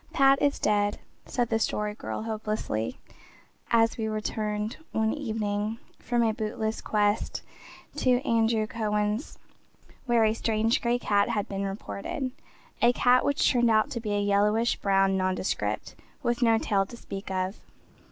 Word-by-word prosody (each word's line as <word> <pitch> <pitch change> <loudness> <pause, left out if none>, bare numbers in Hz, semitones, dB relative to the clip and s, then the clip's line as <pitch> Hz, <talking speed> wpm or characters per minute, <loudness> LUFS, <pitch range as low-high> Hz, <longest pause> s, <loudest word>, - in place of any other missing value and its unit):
"Pat 275 0 +5
is 285 -1 +2
dead," 205 -1 +1 0.3
said 240 -3 -1
the 225 - +1
Story 210 -1 -1
Girl 215 - -5
hopelessly, 215 - -3 0.7
as 230 0 +3
we 220 - -1
returned 215 +1 -2 0.2
one 220 0 +1
evening 215 -5 -2 0.2
from 240 -1 0
a 220 -1 +2
bootless 220 0 -3
quest 210 0 0 0.5
to 250 -1 +3
Andrew 225 -3 +2
Cowan's 210 +2 -2 0.7
where 235 -2 +4
a 215 - +3
strange 225 0 +1
gray 240 0 +1
cat 205 -3 +1
had 215 -4 -1
been 195 0 -3
reported 200 +6 -4 0.5
a 240 +1 +5
cat 250 +1 +4
which 285 - +2
turned 240 -2 +3
out 215 -1 +3
to 235 - -3
be 215 -2 -3
a 205 - +1
yellowish 205 +3 +2
brown 195 -1 +2
nondescript, 185 0 -1 0.3
with 240 +1 0
no 230 -2 +5
tail 200 -3 +1
to 235 +5 -10
speak 195 -3 -7
of. 185 +1 -2
220 Hz, 150 wpm, -27 LUFS, 205-235 Hz, 0.7 s, Pat